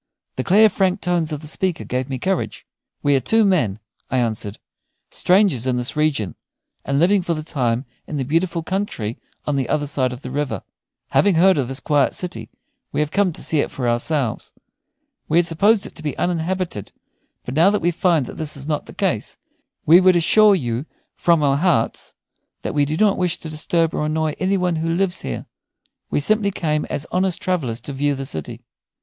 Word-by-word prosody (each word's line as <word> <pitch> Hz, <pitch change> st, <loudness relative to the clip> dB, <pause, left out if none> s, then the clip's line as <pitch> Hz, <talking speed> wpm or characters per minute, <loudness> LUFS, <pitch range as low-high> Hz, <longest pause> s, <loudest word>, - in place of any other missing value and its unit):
The 130 Hz, -, -2 dB
clear, 210 Hz, +8 st, +6 dB
frank 190 Hz, -2 st, +1 dB
tones 170 Hz, -3 st, 0 dB
of 150 Hz, -1 st, -4 dB
the 155 Hz, -, -8 dB
speaker 175 Hz, +2 st, -1 dB
gave 130 Hz, +2 st, -3 dB
me 135 Hz, -, -2 dB
courage. 185 Hz, +7 st, -2 dB, 0.4 s
"We 145 Hz, -1 st, +3 dB
are -, -, +4 dB
two 220 Hz, -, +3 dB
men," 150 Hz, -, +2 dB, 0.3 s
I 130 Hz, -, 0 dB
answered, 110 Hz, -4 st, -2 dB, 0.5 s
"strangers 180 Hz, -, +2 dB
in 125 Hz, -1 st, +1 dB
this 125 Hz, 0 st, -3 dB
region, 140 Hz, -, 0 dB, 0.5 s
and 140 Hz, 0 st, -1 dB
living 185 Hz, +6 st, +4 dB
for 170 Hz, -1 st, -1 dB
the 155 Hz, -, -5 dB
time 125 Hz, -5 st, -1 dB, 0.2 s
in 150 Hz, -, -4 dB
the 135 Hz, -, -1 dB
beautiful 165 Hz, +3 st, 0 dB
country 160 Hz, -, -3 dB, 0.3 s
on 145 Hz, -2 st, 0 dB
the 135 Hz, -, -1 dB
other 145 Hz, -1 st, 0 dB
side 140 Hz, -3 st, 0 dB
of 125 Hz, +2 st, -9 dB
the 125 Hz, -, -6 dB
river. 135 Hz, -, -2 dB, 0.5 s
Having 200 Hz, -3 st, +3 dB
heard 185 Hz, 0 st, +5 dB
of 130 Hz, -, 0 dB
this 135 Hz, +2 st, -3 dB
quiet 145 Hz, -3 st, +1 dB
city, 115 Hz, -12 st, -6 dB, 0.4 s
we -, -, -2 dB
have 150 Hz, 0 st, 0 dB
come 200 Hz, -1 st, +2 dB
to -, -, -6 dB
see 155 Hz, -, +1 dB
it -, -, 0 dB
for 125 Hz, -3 st, -3 dB
ourselves. 120 Hz, +1 st, -1 dB, 0.8 s
We 160 Hz, -, +3 dB
had 175 Hz, -, +5 dB
supposed 200 Hz, +6 st, +3 dB
it -, -, -9 dB
to -, -, -9 dB
be 150 Hz, -4 st, -4 dB
uninhabited, 175 Hz, -, -2 dB, 0.5 s
but 125 Hz, -, -5 dB
now 165 Hz, +7 st, +5 dB
that 210 Hz, -, +2 dB
we 175 Hz, +1 st, +1 dB
find 170 Hz, -4 st, +2 dB
that -, -, -9 dB
this 155 Hz, -2 st, -2 dB
is 140 Hz, +1 st, -7 dB
not 150 Hz, -2 st, -2 dB
the -, -, -11 dB
case, -, -, -1 dB, 0.5 s
we 170 Hz, +4 st, +7 dB
would 185 Hz, -1 st, +5 dB
assure 205 Hz, +5 st, +5 dB
you 125 Hz, -3 st, -3 dB, 0.3 s
from 170 Hz, -3 st, +2 dB
our 140 Hz, -1 st, +3 dB
hearts 155 Hz, -8 st, 0 dB, 0.5 s
that -, -, -3 dB
we 145 Hz, -1 st, +2 dB
do 155 Hz, +2 st, -2 dB
not 205 Hz, -1 st, +3 dB
wish 180 Hz, -3 st, +1 dB
to 160 Hz, -, -8 dB
disturb 160 Hz, +1 st, 0 dB
or 150 Hz, -, -1 dB
annoy 155 Hz, 0 st, 0 dB
any 190 Hz, +1 st, +1 dB
one 180 Hz, -3 st, 0 dB
who 165 Hz, +1 st, -1 dB
lives 190 Hz, -1 st, 0 dB
here. 60 Hz, -, -5 dB, 0.6 s
We -, -, +1 dB
simply 215 Hz, +5 st, +2 dB
came 155 Hz, -5 st, -1 dB
as 145 Hz, -, -4 dB
honest 185 Hz, -1 st, 0 dB
travellers 140 Hz, -11 st, -1 dB
to 140 Hz, -, -7 dB
view 145 Hz, +1 st, 0 dB
the 135 Hz, 0 st, -5 dB
city." 80 Hz, -, -5 dB
155 Hz, 205 wpm, -21 LUFS, 135-180 Hz, 0.8 s, we